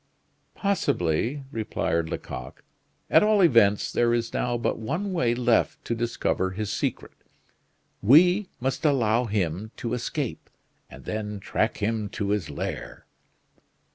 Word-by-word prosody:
"Possibly," 135 - 0
replied 85 -7 -1
Lecoq. 65 -4 -7 0.5
"At - - +7
all 210 -1 +4
events, 115 - +4
there 120 0 +2
is 115 0 -2
now 120 -1 0
but 115 - -1
one 170 - -3
way 120 -9 +1
left 120 -2 +1
to - - -1
discover 115 -5 -1
his 105 +2 -4
secret; - - -3 0.9
we 180 - +5
must 130 +2 -2
allow 125 -5 +2
him 100 -1 -2
to 120 0 -3
escape 125 +1 -3 0.4
and - - -13
then 105 -1 -4
track 110 +3 -1
him 110 -1 -1
to 100 - -1
his 100 -5 -1
lair." - - -6
115 Hz, 130 wpm, -26 LUFS, 105-135 Hz, 0.9 s, At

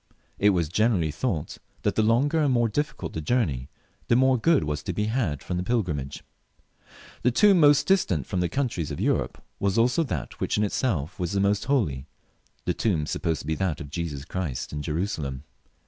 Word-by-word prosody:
It 105 - +5
was 85 -5 +1
generally 90 -3 +1
thought 80 - -3 0.2
that - - +1
the - - +2
longer 130 +9 +3
and 145 -3 +2
more 120 -2 +3
difficult 115 - -3
the 80 - -3
journey, 75 - 0 0.4
the - - +4
more 130 +1 +4
good 160 +5 +3
was 75 0 -2
to - - -4
be 105 - -1
had 105 - -1
from 90 - -3
the 90 - -1
pilgrimage. 90 - -2 1.0
The 125 - +3
tomb 195 - +5
most 145 -2 +6
distant 95 - +2
from 95 - -2
the 90 -1 0
countries 115 - -2
of 75 - -5
Europe - - -1 0.2
was 100 +1 0
also 125 +8 +3
that 80 - -5
which - - 0
in 105 - +2
itself 95 - -1
was 90 0 -2
the 100 - +1
most 100 +1 +1
holy, 80 - 0 0.6
the - - +1
tomb 90 -9 0
of 80 -1 -2
Jesus 75 -4 -4
Christ 80 -9 -4
in 75 - -3
Jerusalem. 75 -4 -3
95 Hz, 180 wpm, -26 LUFS, 75-120 Hz, 1.0 s, most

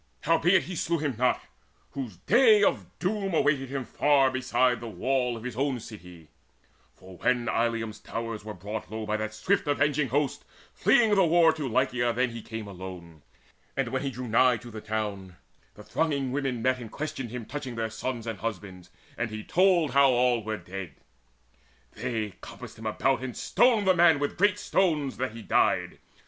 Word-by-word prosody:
Howbeit 165 +3 +3
he 185 - -6
slew 170 +1 0
him 145 -3 -1
not, 125 0 +2 0.5
whose 125 -10 -6
day 215 - +5
of - - +1
doom 195 -1 -1
Awaited 140 -4 +2
him 135 -1 -3
afar 135 +1 +3
beside 130 -1 +1
the 115 - -7
wall 125 +1 -1
Of 115 - -10
his 125 -3 -5
own 135 0 0
city; 90 -8 -12 0.7
for 95 -1 -14
when 120 +3 +1
Illium's 115 -1 -1
towers 115 -2 -5
Were 105 0 -7
brought 105 +4 -6
low 110 +1 -5
by 105 0 -1
that 110 0 -4
swift 170 - 0
avenging 145 0 +1
host 140 +3 -1 0.3
Fleeing 225 -3 +4
the 195 -2 +5
war 165 -1 +5
to 155 -3 -4
Lycia 125 -1 +1
then 125 +1 0
he 115 0 -7
came 110 0 -7
Alone; 90 -4 -9 0.6
and - - 0
when - - -2
he 140 - -2
drew 125 -1 -6
nigh 120 +2 +4
to 120 +1 -11
the 110 -1 -7
town, 105 -4 -4 0.4
The - - -12
thronging 140 -5 -1
women 135 -4 -2
met 130 0 +2
and 115 -3 -9
questioned 145 -5 -5
him 120 -1 -6
Touching 135 -3 -6
their 110 -1 -2
sons 115 +1 -4
and 115 -2 -5
husbands; 95 -5 -6 0.3
and 115 0 -1
he 110 0 -6
told 175 -5 +3
How 140 +1 +5
all 125 -2 +2
were 110 0 -3
dead. 95 -3 -8 1.0
They 110 -3 -3
compassed - - -10
him 110 - -5
about, 130 +5 +1
And 130 -2 -6
stoned 225 0 +3
the 190 - +5
man 170 -3 +6
with 145 0 -2
great 205 +1 +3
stones, 155 -10 0
that 130 -2 -2
he 115 -1 -9
died. - - +1
125 Hz, 185 wpm, -27 LUFS, 110-145 Hz, 1.0 s, man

